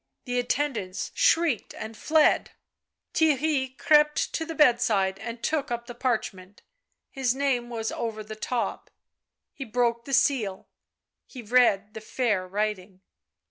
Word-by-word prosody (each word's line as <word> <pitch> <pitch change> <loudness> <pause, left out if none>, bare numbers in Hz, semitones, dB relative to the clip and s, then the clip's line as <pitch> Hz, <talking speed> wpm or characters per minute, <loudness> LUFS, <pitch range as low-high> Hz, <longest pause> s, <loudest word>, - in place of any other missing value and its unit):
The 245 -1 -1
attendants 245 -7 -2
shrieked 325 - +2
and 220 +1 -7
fled. 310 +6 +2 0.6
Theirry 285 -4 +1
crept 300 0 +3
to 320 - -2
the 325 - -5
bedside 225 -9 +3
and 230 0 -7
took 300 -2 -1
up 235 0 -3
the 245 - -8
parchment; 215 -6 -3 0.5
his 260 -2 0
name 265 -3 0
was 225 -2 -3
over 220 -2 -4
the 215 +1 -8
top; 235 +2 -3 0.6
he 270 - -6
broke 235 -1 0
the 275 - -6
seal. 245 -8 +1 0.6
He 250 -3 -10
read 215 -3 +3
the 220 - -8
fair 215 -5 -1
writing. 195 -1 -3
240 Hz, 135 wpm, -26 LUFS, 215-270 Hz, 0.6 s, crept